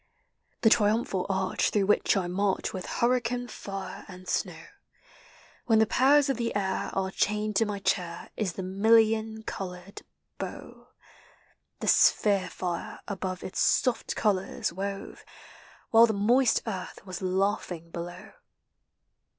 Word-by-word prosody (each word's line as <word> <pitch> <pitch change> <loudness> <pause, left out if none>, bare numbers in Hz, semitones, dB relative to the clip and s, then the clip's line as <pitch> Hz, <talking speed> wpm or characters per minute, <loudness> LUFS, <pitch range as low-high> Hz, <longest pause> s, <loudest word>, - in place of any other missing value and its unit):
The 225 - +6
triumphal 210 -4 +2
arch 190 -1 0
through 205 -2 +1
which 205 0 +3
I 190 - 0
march 190 +2 -1
With 185 - -5
hurricane, 245 0 0
fire, 195 -4 -7
and 185 -1 -12
snow. - - -2 1.0
When 225 -2 +4
the 220 - +5
powers 275 +5 +4
of 270 -4 0
the 235 -1 -1
ail 190 -2 -1
are 190 0 -1
chained 210 +1 0
to 225 - +3
my 205 -1 -3
chair, 180 -3 -2
Is 195 -6 -2
the 190 - -5
million 220 +3 +2
colored 185 -1 -7 0.4
bow; - - -8 0.9
The - - -3
sphere 195 -3 +4
tire 175 -1 -5
above 185 -2 -4
its 190 - -5
soft 250 -2 +1
colors 210 +1 0
wove, 195 +2 -5 0.7
While 230 +1 +7
the 220 - 0
moist 235 +5 +3
earth 190 -5 -6
was 185 -1 -6
Laughing 185 -3 -1
below. 175 +4 -7
200 Hz, 135 wpm, -28 LUFS, 185-220 Hz, 1.0 s, While